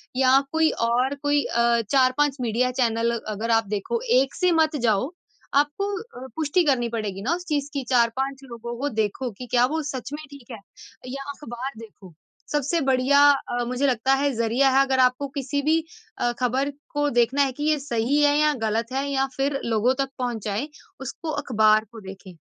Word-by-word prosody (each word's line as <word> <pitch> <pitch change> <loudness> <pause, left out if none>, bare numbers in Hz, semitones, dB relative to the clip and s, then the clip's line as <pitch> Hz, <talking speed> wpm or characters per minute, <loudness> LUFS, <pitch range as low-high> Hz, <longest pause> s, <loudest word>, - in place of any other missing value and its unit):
या 265 +1 +5
कोई 320 0 +3 0.2
और 250 +4 +1
कोई 290 0 +2
अ, 235 0 +2
4-5 270 +1 +3
मीडिया 245 +2 0
चैनल 230 -1 +2 0.2
अगर 215 +2 -2
आप 225 -2 +2
देखो, 210 - -2 0.2
1 270 - -3
से 360 -1 +2
मत 320 -2 +2
जाओ। 225 +5 +1 0.4
आपको 295 +8 +1
अ, 265 - -11
पुष्टि 320 +3 +1
करनी 250 -5 +1
पड़ेगी 210 -4 -4
ना 275 +10 0
उस 360 - -8
चीज़ 290 -2 -1
की, 280 -2 -2
4-5 265 +2 +1
लोगों 235 0 -6
को 285 +2 -1
देखो 220 +2 -2
कि 250 - -7
क्या 245 0 +4
वो 320 - 0
सच 275 -1 -5
में 300 +1 -6
ठीक 270 -3 -13
है? 225 - -7 0.5
या 275 +2 -5
अखबार 260 -2 -6
देखो। 210 -5 -13 0.4
सबसे 295 +3 0
बढ़िया 270 +1 +3
अ, 245 -3 -2
मुझे 250 +3 0
लगता 260 +1 +2
है 280 +1 +1
ज़रिया 235 +4 +2
है 270 +1 +5
अगर 265 -1 0
आपको 255 +2 +2
किसी 280 +2 -2
भी 315 +3 +2 0.4
अ, 240 - +1
खबर 260 +3 0 0.2
को 290 0 +1
देखना 255 +4 +2
है 270 - 0
कि 290 - -6
ये 305 0 +2
सही 270 +1 0
है 290 0 +4
या 300 0 +3
गलत 225 +3 -1
है 270 +1 -1
या 270 -1 +1
फिर 275 0 0
लोगों 230 +2 +2
तक 270 - -7
पहुँचाए, 230 0 -2 0.3
उसको 310 +5 -5
अखबार 215 -3 +3
को 225 -2 -11
देखें। 190 -1 -11
260 Hz, 190 wpm, -24 LUFS, 235-285 Hz, 0.5 s, या